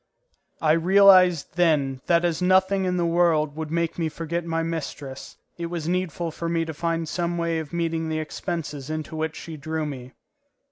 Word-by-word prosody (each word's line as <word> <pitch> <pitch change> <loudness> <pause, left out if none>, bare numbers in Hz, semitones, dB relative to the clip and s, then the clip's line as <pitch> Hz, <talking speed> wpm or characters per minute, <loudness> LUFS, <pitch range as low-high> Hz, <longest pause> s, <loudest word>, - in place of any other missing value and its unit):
I 155 - +4
realized 180 -1 +5
then 145 -7 +2
that 170 0 +3
as 170 0 0
nothing 190 +1 +3
in 180 0 0
the 175 - +1
world 165 -3 +2
would 160 -1 -5
make 170 +1 -1
me 165 -1 0
forget 170 +2 -3
my 165 0 -1
mistress, 150 -5 -6 0.2
it 170 - -2
was 170 -2 -4
needful 175 -2 -1
for 165 +2 -4
me 165 -1 0
to 160 - -5
find 165 +1 -2
some 175 +1 -2
way 170 -1 0
of 155 -3 -7
meeting 165 -1 -1
the 160 - -1
expenses 155 -3 -4
into 155 0 -4
which 160 0 -2
she 160 -2 -8
drew 155 +2 -3
me. 130 -3 -7
165 Hz, 185 wpm, -24 LUFS, 155-170 Hz, 0.2 s, realized